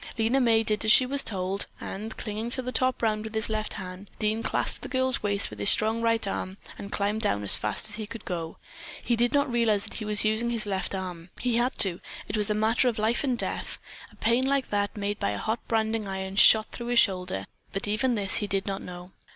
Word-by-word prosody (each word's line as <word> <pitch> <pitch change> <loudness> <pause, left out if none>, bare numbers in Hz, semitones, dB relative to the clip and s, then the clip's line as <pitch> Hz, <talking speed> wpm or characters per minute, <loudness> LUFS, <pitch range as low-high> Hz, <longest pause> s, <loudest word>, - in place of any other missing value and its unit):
Lena 230 +4 +2
May 225 -2 +3
did 215 0 -1
as 215 - +4
she 255 - +7
was 275 +2 +1
told, 190 -1 -2
and, 215 +3 -6
clinging 220 +1 -4
to 260 +1 0
the 255 - -4
top 255 -1 0
round 215 -1 +1
with 220 0 -7
his 220 0 +2
left 215 0 -2
hand, 185 0 -8
Dean 215 +1 0
clasped - - -1
the - - -7
girl's 260 -1 +1
waist 200 - -1
with 105 - -10
his 100 - +2
strong 220 +1 +2
right 230 -1 +1
arm 190 0 -4 0.2
and 200 - -7
climbed 210 +2 -1
down 105 - 0
as 100 - +7
fast 105 - 0
as 215 - +4
he 215 -2 -5
could 230 0 -9
go. 165 -2 -4 0.5
He 240 - +1
did 240 +1 +1
not 285 -2 +1
realize 225 -4 +2
that - - -5
he 215 - -5
was 210 0 +1
using 220 +2 +1
his 230 -3 +3
left 195 -1 -2
arm. 180 -2 -6
He 245 -2 0
had 245 +2 0
to, 180 -3 +1 0.3
it - - -3
was 210 -1 +3
a 210 - +1
matter 220 +4 +2
of 235 - 0
life 220 +5 +1
and 255 -4 0
death. - - -2 0.3
A - - -19
pain 235 +3 +2
like 275 0 0
that 205 +1 -1
made 205 0 -2
by - - 0
a 105 - -3
hot 220 - -2
branding 220 -1 0
iron 190 0 -4
shot 215 +2 +6
through 240 - -7
his 240 -1 +4
shoulder, 180 - +1 0.3
but 195 +1 -4
even 235 +4 +1
this 200 -3 +2
he 205 - -2
did 195 -1 -1
not 195 -1 -3
know. 180 0 -9
215 Hz, 245 wpm, -27 LUFS, 195-230 Hz, 0.5 s, she